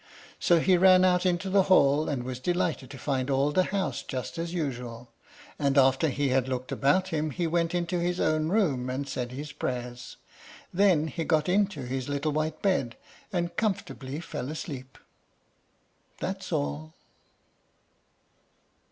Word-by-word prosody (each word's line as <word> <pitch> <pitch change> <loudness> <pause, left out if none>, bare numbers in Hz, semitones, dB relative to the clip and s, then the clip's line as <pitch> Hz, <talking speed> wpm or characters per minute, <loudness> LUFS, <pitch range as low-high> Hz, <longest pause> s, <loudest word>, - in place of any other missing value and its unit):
So 170 -1 +4
he 185 +2 +4
ran 185 0 +6
out 180 0 +3
into 180 +2 0
the 195 +1 +4
hall, 145 -4 +4
and 135 -4 -2
was 125 0 -5
delighted 175 -4 -1
to 135 - -9
find 135 -1 -1
all 140 +2 +2
the 185 +4 +3
house 195 -1 -2
just 130 +5 -5
as 165 0 -3
usual, 125 -7 -4 0.5
and 140 -1 +1
after 135 +3 +4
he 140 +1 0
had 130 0 +2
looked 130 0 -3
about 185 +7 +2
him 155 -1 -1
he 170 +4 -2
went 170 +1 0
into 175 0 -1
his 175 +1 -1
own 155 0 +1
room, 150 - +1
and 135 +2 -3
said 125 -2 -4
his 145 +4 -6
prayers. 125 -2 -5 0.6
Then 180 -5 +4
he 165 +1 -3
got 155 -2 +1
into 190 -5 +1
his 130 +1 -4
little 145 +2 -1
white 155 +1 -2
bed, 135 - +1 0.3
and 175 -2 -2
comfortably 145 - -2
fell 135 -5 -5
asleep. 135 -4 -7 1.2
That's - - -4
all. 75 +2 -3
150 Hz, 155 wpm, -28 LUFS, 130-175 Hz, 1.2 s, ran